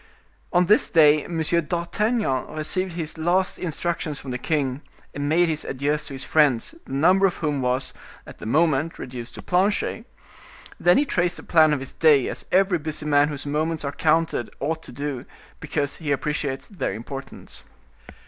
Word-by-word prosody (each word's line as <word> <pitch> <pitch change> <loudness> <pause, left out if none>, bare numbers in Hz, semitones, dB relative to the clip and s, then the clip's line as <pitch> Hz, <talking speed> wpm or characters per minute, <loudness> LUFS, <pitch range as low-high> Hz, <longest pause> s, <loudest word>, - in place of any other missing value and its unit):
On 180 -1 +4
this 210 +4 +4
day 150 -3 +5
M. 170 -2 -4
d'Artagnan 170 - 0
received 185 +4 -1
his 160 -1 -5
last 180 +3 +1
instructions 165 -3 -3
from 135 - -7
the 125 - -3
king, 140 -3 -1 0.3
and 145 0 -2
made 170 +3 +4
his 155 -2 -2
adieus 145 +3 -2
to 140 - -7
his 135 - -4
friends, 145 - +2
the - - -8
number 185 +8 +4
of 180 - -3
whom 150 -4 -1
was, 125 +1 -1 0.3
at - - -12
the - - -7
moment, 155 +3 +1
reduced 125 -2 -8
to - - -9
Planchet, 205 +5 0 0.7
then 175 0 +5
he 290 - +3
traced 175 -8 0
the - - -9
plan 155 -2 +5
of 150 - +1
his 135 - -7
day, 150 -5 +4
as - - -5
every 190 -1 +3
busy 155 0 -5
man 145 -1 +4
whose 145 -2 -6
moments 155 +2 -1
are 140 - -2
counted 160 -5 +1
ought 160 +3 -2
to - - -10
do, 140 -3 -4 0.4
because 145 -2 -2
he 150 -3 -3
appreciates 140 -1 -2
their 195 - -3
importance. 135 +5 -8
155 Hz, 175 wpm, -24 LUFS, 140-175 Hz, 0.7 s, day